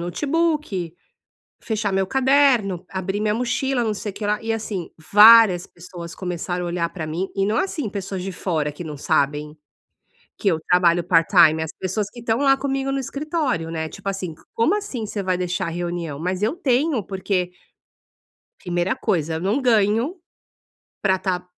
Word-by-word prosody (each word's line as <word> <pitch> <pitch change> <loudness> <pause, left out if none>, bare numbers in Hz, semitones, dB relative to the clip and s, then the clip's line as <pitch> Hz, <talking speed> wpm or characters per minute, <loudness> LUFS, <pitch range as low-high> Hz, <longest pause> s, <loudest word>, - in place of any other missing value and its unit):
notebook, 275 - -1 0.7
fechar 215 -3 -2
meu 190 -1 +1
caderno, 265 -9 +3
abrir 190 +2 -3
minha 210 -1 +1
mochila, 250 +1 0
não 215 -1 0
sei 205 0 -5
o - - -19
que 205 - -5
lá, 210 +1 0
e 225 0 -1
assim, 210 -5 -4 0.2
várias 210 -4 +8
pessoas 170 -1 -10
começaram 180 0 -3
a - - -3
olhar 170 -1 -1
pra 165 -4 -5
mim 175 +5 -2
e 195 0 +1
não 215 +3 0
assim, 300 - -1
pessoas 195 -2 -5
de 195 - -4
fora 160 -5 -2
que 160 +4 -8
não 150 -2 -6
sabem 150 +2 0 0.8
que 200 - +1
eu 165 -3 +2
trabalho 175 0 +3
part-time, 165 -2 +5
as 160 - -4
pessoas 195 +2 -2
que 240 - -11
estão 225 0 0
lá 270 -1 +4
comigo 270 0 -2
no 275 - -1
escritório, 275 - -2
né, 160 -1 -3
tipo 195 - -7
assim: 185 -4 -3
"C - - -21
como 310 - +2
assim 280 - -4
você 205 -1 -4
vai 185 -1 0
deixar 180 -1 -2
a - - -3
reunião?". 170 -3 -4
Mas 185 +3 -2
eu 230 +11 0
tenho 270 - +1
porque 185 -2 -2 1.1
primeira 175 0 -1
coisa, 160 -3 -1
eu 160 - -3
não 205 +9 0
ganho 230 - +2 0.9
pra 190 -2 +2
tá 180 -1 -2
195 Hz, 180 wpm, -22 LUFS, 175-230 Hz, 1.1 s, várias